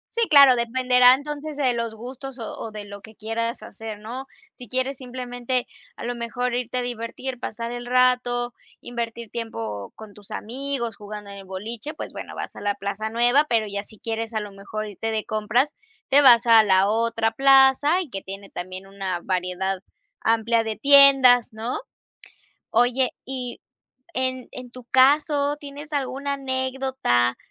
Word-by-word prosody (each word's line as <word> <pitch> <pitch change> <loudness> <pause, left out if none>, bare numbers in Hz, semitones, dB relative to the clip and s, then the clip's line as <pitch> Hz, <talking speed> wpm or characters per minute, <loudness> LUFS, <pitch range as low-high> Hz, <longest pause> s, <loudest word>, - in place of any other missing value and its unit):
Sí, 465 -1 +2
claro, 280 -4 +8
dependerá 250 +1 +5
entonces 295 +1 -6
de 260 -4 +2
los 230 -1 -3
gustos 255 +3 -8
o 225 -3 -6
o - - -5
de 210 -1 -7
lo 200 0 -10
que 220 +2 -14
quieras 230 +2 -3
hacer, 220 -1 -8
¿no? 240 +6 -7 0.3
Si 245 - -12
quieres 260 +3 0
simplemente, 250 -1 -3 0.3
a - - -9
lo 245 - -2
mejor 240 +1 -3
irte 245 0 -2
a - - +1
divertir, 245 +2 -5
pasar 230 +1 -5
el 240 0 -6
rato, 250 -1 +2 0.3
invertir 235 -2 -6
tiempo 110 - -5
con 215 -2 -12
tus 205 -1 -14
amigos, 245 -1 -2
jugando 210 -1 -8
en 200 - -8
el 195 - -10
boliche, 220 +9 -6
pues - - -7
bueno, - - -8
vas - - -6
a - - -9
la 205 0 0
plaza 200 +2 -4
nueva, 245 +6 +3
pero 225 -2 +2
ya 200 -1 -4
si 215 - -15
quieres 225 +1 -4
a - - +2
lo 210 -1 -7
mejor 200 +2 -6
irte 210 +2 -4
de 220 -1 -2
compras, 225 +7 0 0.3
te 280 +2 +6
vas 240 -3 +7
a 230 -1 +8
la 195 -2 +3
otra 225 +1 +1
plaza 270 +5 +5
y 325 -8 -8
que 195 - -4
tiene 195 +1 -9
también 185 +1 -7
una 195 -2 -4
variedad 185 +1 -1 0.4
amplia 230 +1 +2
de 220 -1 -3
tiendas, 270 -3 +7
¿no? 225 - -3 0.9
Oye, 245 +2 +3 0.2
y 255 -2 -5 0.5
en 255 -1 -2
en 250 -1 -9
tu 255 0 -9
caso, 285 +2 +4
¿tienes 290 +1 -10
alguna 280 0 -2
anécdota, 260 - 0
240 Hz, 170 wpm, -24 LUFS, 215-260 Hz, 0.9 s, claro